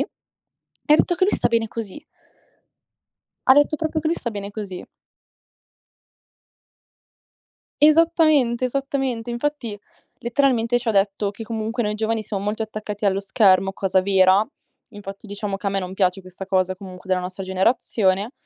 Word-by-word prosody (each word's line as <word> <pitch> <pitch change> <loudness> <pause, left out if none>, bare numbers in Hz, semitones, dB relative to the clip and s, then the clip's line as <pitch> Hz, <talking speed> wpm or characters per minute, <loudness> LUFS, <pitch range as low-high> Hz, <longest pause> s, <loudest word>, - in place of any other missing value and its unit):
e - - -8 0.6
ha - - +6
detto 350 - +2
che 370 - +3
lui 400 - +2
sta - - +1
bene 230 -1 +1
così. 230 +6 -7 1.5
Ha 260 - +9
detto 290 +2 +3
proprio 315 0 -2
che 310 - -2
lui 330 - +1
sta 235 -7 -4
bene 200 -1 -6
così. 200 -3 -7 3.0
Esattamente, 305 -6 +4
esattamente. 265 -3 -2
Infatti, 240 -3 -3 0.4
letteralmente, 245 -1 +1
ci 240 - -9
ha 225 - +3
detto 200 0 +1
che 225 - -8
comunque 225 +1 -3
noi 210 0 -1
giovani 220 0 -1
siamo 200 -2 -4
molto 215 +2 -2
attaccati 215 -1 -5
allo 195 -1 +2
schermo, 195 -1 +3
cosa 190 -1 +1
vera, 190 +1 +4 0.4
infatti 200 0 -9
diciamo 205 -1 -4
che 200 - -4
a - - +2
me 195 0 -1
non 185 -1 -6
piace 190 -1 +1
questa 185 +1 -9
cosa 185 -1 0
comunque 185 0 -11
della 185 - +2
nostra 185 +2 -6
generazione. 190 +2 +1
210 Hz, 155 wpm, -22 LUFS, 195-245 Hz, 3.0 s, Ha